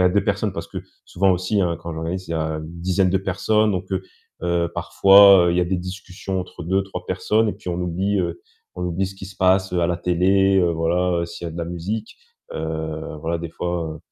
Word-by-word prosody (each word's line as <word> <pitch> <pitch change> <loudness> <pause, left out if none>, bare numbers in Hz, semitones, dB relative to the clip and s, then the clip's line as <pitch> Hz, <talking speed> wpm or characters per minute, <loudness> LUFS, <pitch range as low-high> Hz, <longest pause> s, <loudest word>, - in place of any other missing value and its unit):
a 90 - +6
2 100 +2 +1
personnes 100 0 0
parce 85 -3 -5
que - - -5 0.3
souvent 95 +1 +2
aussi, 95 +3 0
hein, 85 -3 0
quand 85 - -5
j'organise, 85 +4 -4
il - - -7
y - - -1
a 80 - 0 0.2
une 80 +2 -9
dizaine 95 +1 +2
de 95 - +2
personnes 100 +3 +1
donc 95 0 -2
heu, 95 0 -1 0.4
heu, 85 -1 0
parfois, 100 -2 +7
heu, - - +3
il 90 - +1
y - - +4
a - - +2
des 95 +1 -1
discussions 95 +1 -5
entre 90 -1 -8
2-3 95 +1 -2
personnes 105 +5 +1
et - - 0
puis - - -9
on 90 - -1
oublie, 95 +4 0
heu, 85 -1 -3 0.3
on 90 - -4
oublie 90 +2 -1
ce 95 - -8
qui 95 - -8
se 95 - -13
passe, 95 0 +3
heu, 90 - +1
à - - +3
la 90 - 0
télé, 95 +3 +3
heu, 90 -2 +3
voilà, 85 +1 0
s'il 85 - -9
y - - -2
a - - -8
de 85 - -8
la 85 - -2
musique, 95 +6 -5 0.4
heu, 80 0 -4
voilà, 85 +2 -1
des 85 -1 -6
fois, 85 0 -3
heu, - - -13
90 Hz, 245 wpm, -22 LUFS, 85-95 Hz, 0.4 s, parfois